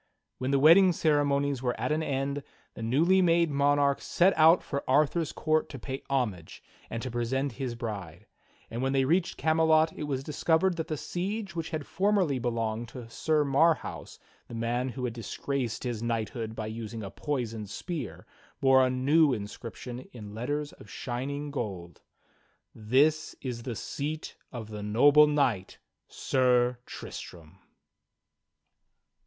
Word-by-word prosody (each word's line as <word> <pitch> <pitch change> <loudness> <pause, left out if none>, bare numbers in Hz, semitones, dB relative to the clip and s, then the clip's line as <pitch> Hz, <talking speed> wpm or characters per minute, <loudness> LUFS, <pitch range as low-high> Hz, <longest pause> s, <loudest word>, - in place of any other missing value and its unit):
When 130 - -2
the 140 - +3
wedding 170 +6 +7
ceremonies 145 -4 +1
were 125 -2 -2
at - - -1
an 155 +1 +1
end, 140 -1 -2 0.3
the - - -9
newly 160 +12 +3
made 170 -2 +3
monarch 140 0 +2
set 185 +3 +3
out 160 +2 +6
for 140 -1 -3
Arthur's 150 +4 +2
court 155 0 0
to 140 - -7
pay 135 +2 -5
homage 110 -12 -2 0.3
and 115 - -4
to 130 - -4
present 130 +4 -1
his 120 0 -4
bride; 100 -8 -6 0.5
and 115 - -3
when 135 +1 0
they 135 -1 +3
reached 170 +5 +1
Camelot 160 0 +3
it 150 - -5
was 135 -2 -2
discovered 165 +4 +1
that 160 0 -3
the 155 -3 -3
siege 190 +4 -4
which 165 -1 -3
had 155 -2 -4
formerly 190 -8 +1
belonged 115 -1 -2
to 115 0 -9
Sir 155 +2 +1
Marhaus, 155 +4 +1 0.3
the 120 - -8
man 120 +3 -1
who 125 +1 -4
had 120 - -3
disgraced 120 +1 -3
his 120 -4 -3
knighthood 115 -1 -3
by 110 - -4
using 110 0 -6
a 95 - -6
poisoned 115 -1 -3
spear, 170 - -6 0.3
bore 135 -1 +5
a 130 - +3
new 140 +4 +3
inscription 115 +3 -6
in 105 -4 -9
letters 145 +6 -3
of - - -15
shining 140 +4 -4
gold: 95 - -5 0.7
"Tins 140 +8 +2
IS 125 -3 -5
THE 120 -1 -5
Seat 150 +7 -5 0.2
of 115 -4 -7
the 105 -1 -6
Noble 140 +9 +6
Kxight, 130 -10 0 0.3
Sir 125 -1 +2
Tristram." 80 -3 -9
135 Hz, 150 wpm, -29 LUFS, 115-155 Hz, 0.7 s, wedding